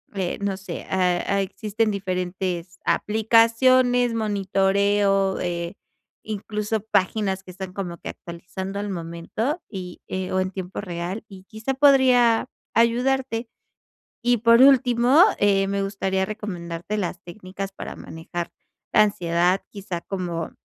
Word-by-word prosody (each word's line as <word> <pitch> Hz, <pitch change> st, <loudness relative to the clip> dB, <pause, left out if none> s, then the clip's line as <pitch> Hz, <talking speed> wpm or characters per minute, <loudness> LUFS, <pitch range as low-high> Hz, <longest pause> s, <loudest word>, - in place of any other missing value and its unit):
Eh, 185 Hz, -3 st, -2 dB
no 200 Hz, -1 st, -1 dB
sé, 195 Hz, -, -7 dB
eh, 180 Hz, -2 st, +1 dB, 0.2 s
existen 215 Hz, +3 st, -1 dB
diferentes 180 Hz, -2 st, -3 dB
aplicaciones, 235 Hz, +3 st, +3 dB
monitoreo, 200 Hz, -1 st, +1 dB
eh, 170 Hz, 0 st, -3 dB, 0.5 s
incluso 210 Hz, 0 st, -3 dB
páginas 195 Hz, -2 st, 0 dB
que 185 Hz, -, -14 dB
están 185 Hz, 0 st, -7 dB
como 175 Hz, -4 st, -5 dB
que -, -, -7 dB
actualizando 185 Hz, +3 st, -7 dB
al 205 Hz, 0 st, -3 dB
momento, 180 Hz, -, -3 dB
y 180 Hz, -3 st, -7 dB
eh, 185 Hz, 0 st, -3 dB
o 185 Hz, -, +1 dB
en 185 Hz, 0 st, -2 dB
tiempo 190 Hz, -1 st, -6 dB
real, 180 Hz, +3 st, -5 dB
y 190 Hz, -2 st, -12 dB
quizá 220 Hz, +6 st, -4 dB
podría 255 Hz, -4 st, +5 dB, 0.3 s
ayudarte. 240 Hz, 0 st, +1 dB, 0.7 s
Y 245 Hz, 0 st, +3 dB
por 230 Hz, +2 st, +5 dB
último, 260 Hz, +2 st, +6 dB, 0.2 s
eh, 195 Hz, -1 st, +3 dB
me 200 Hz, 0 st, -1 dB
gustaría 190 Hz, -1 st, -1 dB
recomendarte 190 Hz, -2 st, -5 dB
las 185 Hz, -1 st, -3 dB
técnicas 190 Hz, +2 st, -7 dB
para -, -, -7 dB
manejar 170 Hz, +1 st, -6 dB, 0.4 s
la -, -, +7 dB
ansiedad, 180 Hz, -2 st, +1 dB
quizá 190 Hz, -4 st, -5 dB
como 175 Hz, -4 st, -4 dB
195 Hz, 125 wpm, -24 LUFS, 185-225 Hz, 0.7 s, la